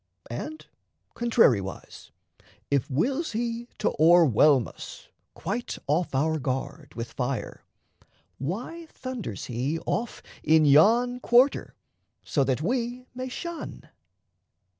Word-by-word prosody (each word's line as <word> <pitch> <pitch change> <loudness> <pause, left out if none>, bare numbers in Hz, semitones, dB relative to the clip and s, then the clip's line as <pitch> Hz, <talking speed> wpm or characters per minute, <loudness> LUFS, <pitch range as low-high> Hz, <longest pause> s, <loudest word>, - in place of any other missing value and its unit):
And, 310 - -6 0.5
contrariwise, 135 - +1 0.6
if 140 -3 +1
wills 265 - 0
he 235 +1 -2
to 210 - 0
o'erwhelm 155 -6 +6
us, - - -11 0.3
Quite 230 +5 -4
off 155 0 0
our 155 +3 +1
guard, 135 +2 -4
with 115 0 -6
fire, 130 -1 -3 0.8
why 240 - -5
thunders 250 - -6
he 130 +6 -2
Off 235 +1 -2 0.2
in 155 0 +4
yon 230 - +5
quarter, 250 +3 +3 0.5
so 140 - +1
that 135 +2 0
we 245 +4 -2
may 255 +1 -5
shun? 340 +5 -7
175 Hz, 105 wpm, -26 LUFS, -, 0.8 s, o'erwhelm